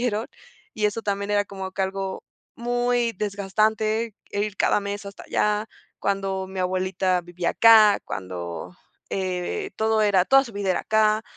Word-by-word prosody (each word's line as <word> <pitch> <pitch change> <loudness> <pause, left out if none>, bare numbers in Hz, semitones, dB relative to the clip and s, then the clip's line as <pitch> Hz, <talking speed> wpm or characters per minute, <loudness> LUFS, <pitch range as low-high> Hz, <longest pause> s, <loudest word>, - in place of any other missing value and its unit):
nacieron, 225 -2 -1 0.5
y 210 -1 +1
eso 220 +2 -2
también 200 0 -2
era 205 0 +2
como 190 -1 -6
que 195 - -1
algo 190 0 -3 0.3
muy 245 0 0
desgastante, 215 +2 0 0.2
el 205 0 -1
ir 210 -2 -6
cada - - +2
mes 200 0 -5
hasta 200 - -9
allá, 210 +1 0 0.3
cuando 195 -1 -1
mi 190 0 -7
abuelita 185 0 0
vivía 175 0 -2
acá, 220 -3 +7
cuando, 90 -2 -6 0.3
eh, 190 - -2
todo 220 0 +2
era, 195 -3 +4
toda 270 +4 +6
su 235 - -10
vida 200 -2 -1
era 180 - +1
acá, 215 0 +2
200 Hz, 160 wpm, -24 LUFS, 190-220 Hz, 0.5 s, acá